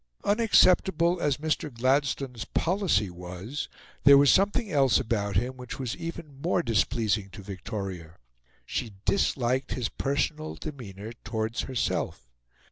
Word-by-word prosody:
Unacceptable 185 -5 +4
as 145 -3 +1
Mr. 155 0 -1
Gladstone's 130 0 0
policy 170 - +1
was, 90 +9 -6 0.3
there 140 0 +9
was 140 0 +6
something 205 +2 +2
else 135 -5 +4
about 100 -5 -1
him 125 +6 0
which 125 -1 -7
was 130 -3 -3
even 155 -4 -7
more 175 +1 +1
displeasing 110 - +1
to 100 +2 -11
Victoria. 95 -3 -6 0.5
She 110 - -3
disliked 130 -9 +1
his 125 -3 -2
personal 150 +3 -2
demeanour 110 -7 -8
towards 110 0 -2
herself. 120 - -2
130 Hz, 125 wpm, -27 LUFS, 105-155 Hz, 0.5 s, there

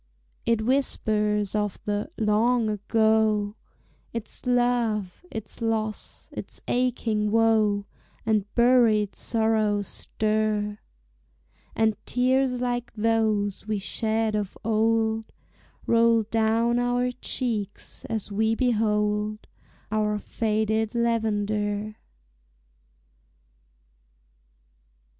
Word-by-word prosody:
It 230 -2 +2
whispers 210 -6 +1
of 210 -2 -1
the 205 +5 -2
"long 225 +2 +2
ago;" 215 0 +2 0.6
Its 230 +2 -7
love, 240 - +1
its 220 -2 -8
loss, 220 -2 -3
its - - -7
aching 230 -4 0
woe, 215 -2 +3 0.4
And 210 -2 +1
buried 235 -4 +4
sorrows 220 -2 +1
stir; 215 0 -1 1.0
And 220 -1 +2
tears 255 0 +2
like 245 -1 -2
those 215 -2 0
we 215 -1 0
shed 220 +2 -1
of 210 -2 -3
old 220 0 +1 0.6
Roll 230 -1 +4
down 225 +2 +1
our 245 +1 +1
cheeks 230 -5 -3
as 220 -2 -4
we 220 +2 +1
behold 215 -3 0 0.5
Our 210 -1 +1
faded 220 +1 -1
lavender. 215 -2 0
220 Hz, 85 wpm, -26 LUFS, 210-230 Hz, 1.0 s, buried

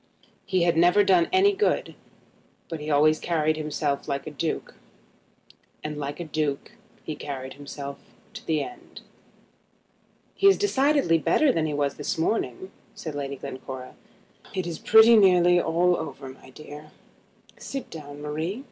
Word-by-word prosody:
He 185 -2 +1
had 170 -1 +2
never 175 +5 +5
done 180 -3 +3
any 390 +2 +4
good, 400 +2 0 0.8
but 165 -2 -5
he 150 - -7
had 150 - +2
always 155 +2 +4
carried 155 -2 0
himself 150 -2 -2
like 140 0 -3
a 155 - -6
duke, 155 +2 -3 1.1
and 150 0 -4
like 145 +1 -5
a - - -3
duke 150 -1 -3 0.3
he 155 - -5
carried 135 -3 -6
himself 140 0 -8 0.3
to 220 - -9
the 155 -1 0
end. 370 -2 -11 1.3
"He 395 - +3
is 390 - +6
decidedly 280 - +2
better 290 - +3
than 160 -8 0
he 150 - -3
was 140 -1 -1
this 145 - -3
morning," 165 - -2 0.2
said 170 -8 -6
Lady 140 -1 -4
Glencora. 130 -1 -8 0.6
"It 185 -2 -1
is 170 -2 -5
pretty 220 +1 +7
nearly 180 -4 +5
all 175 +2 +2
over, 145 -4 -6
my 130 - -14
dear. 150 +2 -11 0.7
Sit 275 -2 -6
down, 145 -2 -9
Marie. 160 +8 -3
155 Hz, 155 wpm, -25 LUFS, 145-185 Hz, 1.3 s, pretty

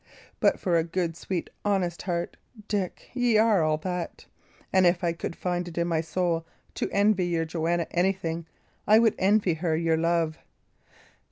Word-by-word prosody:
But - - +3
for 175 -4 +1
a 165 - +2
good, 170 0 -2
sweet, 175 0 -3 0.2
honest 190 -4 0
heart, 175 -2 -3 0.3
Dick, 200 -4 -3
y' 245 -3 +2
are 215 -4 +4
all 155 -1 +2
that; 180 +1 -5 0.5
and 190 -1 +5
if 175 +1 +1
I 170 -1 +1
could 170 - -5
find 175 -1 -2
it 170 - -9
in 170 0 +1
my 165 -2 +1
soul 165 0 -1 0.3
to - - -2
envy 200 -3 +2
your 165 -2 0
Joanna 170 +1 -1
anything, 175 -2 -1 0.4
I 215 - +7
would 225 -1 +4
even - - -6
envy 200 -3 +3
her 160 0 -1
your 165 -1 +1
love." 165 -1 0
175 Hz, 175 wpm, -27 LUFS, 165-190 Hz, 0.5 s, I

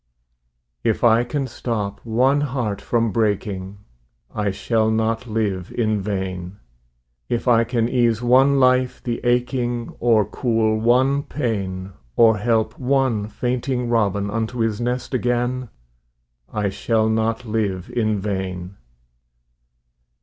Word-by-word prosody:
If - - 0
I 115 0 +5
can 135 +3 -2
stop 105 -5 -3
one 130 +5 +2
heart 125 -8 -2
from 115 -2 0
breaking, 100 -3 -1 0.6
I 105 -1 0
shall 110 +3 0
not 110 +2 0
live 105 -5 -2
in 110 -3 0
vain; 95 -2 -4 0.7
If 120 +2 -2
I 115 -1 +5
can 115 -1 0
ease 120 -3 +2
one 130 +3 +4
life 130 -1 +2
the 120 -1 -2
aching, 120 -1 0
Or 115 -3 +3
cool 110 0 0
one 130 +5 +3
pain, 100 -10 -3 0.2
Or 110 -2 +5
help 110 +1 0
one 130 -5 +1
fainting 125 +2 -2
robin 100 -3 +1
Unto 115 +2 -2
his 115 -1 0
nest 125 +2 -2
again, 125 0 0 0.8
I 105 -2 -1
shall 110 +3 0
not 110 +2 0
live 105 -5 -2
in 110 -3 0
vain. 95 -2 -4
115 Hz, 120 wpm, -21 LUFS, 105-125 Hz, 0.8 s, I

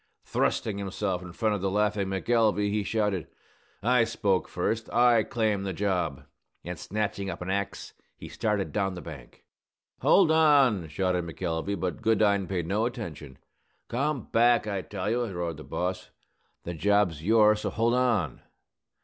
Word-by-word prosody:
Thrusting 100 -2 -1
himself 95 -1 -2
in 90 -1 -9
front 110 +4 0
of 100 - -2
the 95 - 0
laughing 105 0 0
McElvey, 105 +1 +1
he 105 0 0
shouted, 105 -4 -1 0.6
"I 125 +1 +4
spoke 100 -4 0
first! 110 +5 -2
I 120 -2 +5
claim 110 -3 0
the 95 -1 -3
job!" 90 -6 -1 0.4
And, 90 0 -5
snatching 100 +1 -3
up 90 - -5
an 95 - -3
axe, 100 0 -3 0.2
he - - -9
started 105 -3 -1
down 95 -2 -1
the 90 - -7
bank. - - -11 0.6
"Hold 185 -5 +5
on!" 140 - +4
shouted 90 +3 -1
McElvey; 85 +3 -3
but 90 0 -3
Goodine 100 -3 +2
paid 90 -4 -2
no 105 +6 0
attention. 80 - -7 0.5
"Come 140 0 -1
back, 120 0 +4
I 100 -3 -2
tell 95 0 -5
you!" 120 +3 +1
roared 85 -5 -4
the 75 - -9
boss. 90 +1 -3 0.5
"The 85 - -5
job's 100 -2 +1
yours, 105 +2 +4
so - - -1
hold 115 +2 +1
on!" 115 - +1
100 Hz, 160 wpm, -27 LUFS, 90-110 Hz, 0.6 s, I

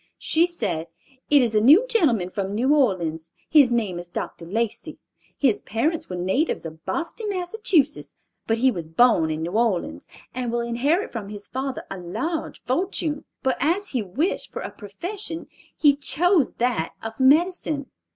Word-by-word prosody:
She 330 +2 +2
said, 195 - -2 0.4
"It 290 -3 +6
is 230 -2 0
a 215 - +4
new 305 - +7
gentleman 255 - +2
from 200 +1 -3
New 260 +6 +3
Orleans. 170 - +1 0.2
His 285 -5 +6
name 210 -7 0
is 175 0 -9
Dr. 170 -1 -5
Lacey. 220 +4 -2 0.4
His 260 -7 +2
parents 305 +9 -1
were 180 - -4
natives 190 - 0
of 160 0 -9
Boston, 345 +6 -3
Massachusetts, 355 - 0 0.3
but 225 - +2
he 260 +3 +4
was 170 -7 -5
born 165 -2 +4
in 155 0 -2
New 170 - -3
Orleans, 220 -4 0 0.3
and 250 -2 -3
will 235 0 0
inherit 265 - 0
from 215 -4 -6
his 205 -1 -8
father 265 0 -4
a 195 - -5
large 315 - -4
fortune; 305 +1 -1 0.2
but 260 -1 +1
as 345 +9 0
he 250 - -1
wished 255 - -2
for - - -5
a - - -5
profession, 330 - -6 0.3
he 290 -2 +5
chose 325 +2 +2
that 235 -9 -1
of 225 +2 -6
medicine. 300 +1 +2
250 Hz, 165 wpm, -24 LUFS, 200-315 Hz, 0.4 s, new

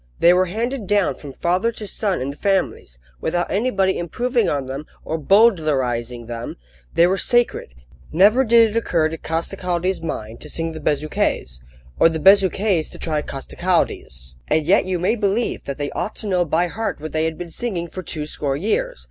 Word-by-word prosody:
They 175 - +6
were 185 +1 +3
handed 230 +3 -3
down 205 -7 +2
from 140 +1 -10
father 185 - +1
to 215 - -8
son 200 - -1
in 135 +2 -2
the - - -10
families, 190 - -1 0.2
without 175 - -1
anybody 195 -3 +1
improving 240 - 0
on 140 -2 -1
them 135 +3 -6 0.2
or 160 - -2
bowdlerising 140 - +2
them: 120 0 -6 0.4
they 170 - +6
were 190 +2 +1
sacred. 240 - +1 0.4
Never 205 +10 +5
did 230 -2 +5
it - - -8
occur 170 -8 +1
to 165 - -5
Costecalde's 180 +2 -1
mind 115 -8 -5
to 150 - -9
sing 165 +2 -2
the 160 - -7
Bezuquets', 145 - -1 0.4
or - - +6
the 160 - -2
Bezuquets 190 -1 +4
to - - -11
try 155 -2 -1
Costecalde's. 135 - -2
And 155 -1 +1
yet 185 +4 +4
you 185 -1 -1
may 180 +6 +1
believe 210 +1 -1
that 140 - -4
they 145 -1 -3
ought 210 - -3
to 215 - -5
know 180 -3 +2
by 165 +3 +1
heart 220 +3 -3
what 155 +1 -6
they 160 0 0
had 160 -1 -2
been 175 -1 -7
singing 185 -7 -3
for 185 - -7
two 155 -3 -5
score 140 -2 -2
years! - - -1
175 Hz, 190 wpm, -21 LUFS, 150-200 Hz, 0.4 s, They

